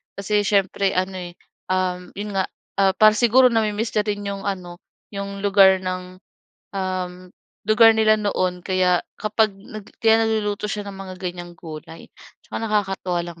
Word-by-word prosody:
Kasi 205 +1 0
siyempre 195 -1 +1
ano 185 +1 -1
eh, 175 -1 -8 0.3
uhm, 180 -1 -2
‘yon 205 +1 -5
nga, 190 - 0 0.3
ah, 195 -1 +3
para 215 0 +7
siguro 250 +2 +5
nami-miss 220 -1 0
na - - +2
rin 205 -1 -2
'yong 200 0 -4
ano, 180 -3 -5 0.3
'yong 200 0 -6
lugar 195 -2 +5
ng, 185 0 -6 0.5
uhm, 185 -1 -4 0.3
lugar 225 +2 +6
nila 215 -1 +4
noon 185 -3 -1
kaya 185 -1 +2 0.2
kapag 215 -1 0
nag 205 +1 -11 0.2
kaya 225 0 +6
nagluluto 210 -2 -1
siya 210 -1 -3
ng 195 -1 -8
mga 190 -1 -7
ganiyang 175 -1 -7
gulay 160 0 -10 0.3
tsaka - - -6
nakakatuwa 195 -5 -1
lang 170 -1 -10
195 Hz, 155 wpm, -22 LUFS, 185-210 Hz, 0.5 s, para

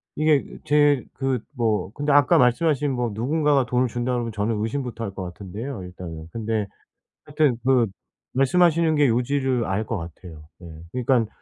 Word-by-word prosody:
이게 155 -2 +3 0.2
제 145 -3 +4
그 135 -2 -1 0.2
뭐 110 -4 0
근데 145 0 -1
아까 145 +4 +5
말씀하신 145 +2 +2
뭐 125 -3 -1
누군가가 140 +3 +1
돈을 125 +1 +1
준다고 120 +2 -2
그러면 115 -1 -3
저는 105 +1 -1
의심부터 120 -1 -3
할 100 - -3
거 95 - -5
같은데요, 100 +5 -7
일단은. 85 -3 -8
근데 110 -2 -2 0.6
하여튼 150 -5 +1
그 130 -4 +3 0.5
말씀하시는 160 +4 +3
게 145 -2 +4
요지를 125 0 +1
알 100 +3 -1
것 115 - -3
같아요. 80 -2 -10
네. 85 - -11 0.3
그러니깐 120 -3 +2
125 Hz, 345 characters per minute, -23 LUFS, 110-145 Hz, 0.6 s, 아까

